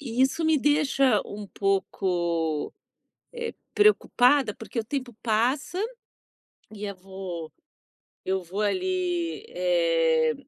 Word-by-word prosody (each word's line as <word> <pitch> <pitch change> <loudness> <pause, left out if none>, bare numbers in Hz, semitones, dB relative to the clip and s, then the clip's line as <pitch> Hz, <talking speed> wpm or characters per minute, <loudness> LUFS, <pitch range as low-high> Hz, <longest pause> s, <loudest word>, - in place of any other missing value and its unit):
e 250 -3 -3
isso 265 +5 +2
me 315 -1 +4
deixa 275 -5 +3
um 205 0 -7
pouco, 175 -5 -1 0.6
eh, 475 -1 -5 0.2
preocupada, 285 - +4
porque 225 +2 -7
o - - -7
tempo 255 -2 -4
passa 245 +9 +1 1.0
e 210 0 -5
a 200 - -4
vou 185 -4 -7 0.7
eu 190 0 -1
vou 185 +5 -4
ali, 360 - -1
eh, 165 -3 +2
215 Hz, 110 wpm, -26 LUFS, 180-290 Hz, 1.0 s, me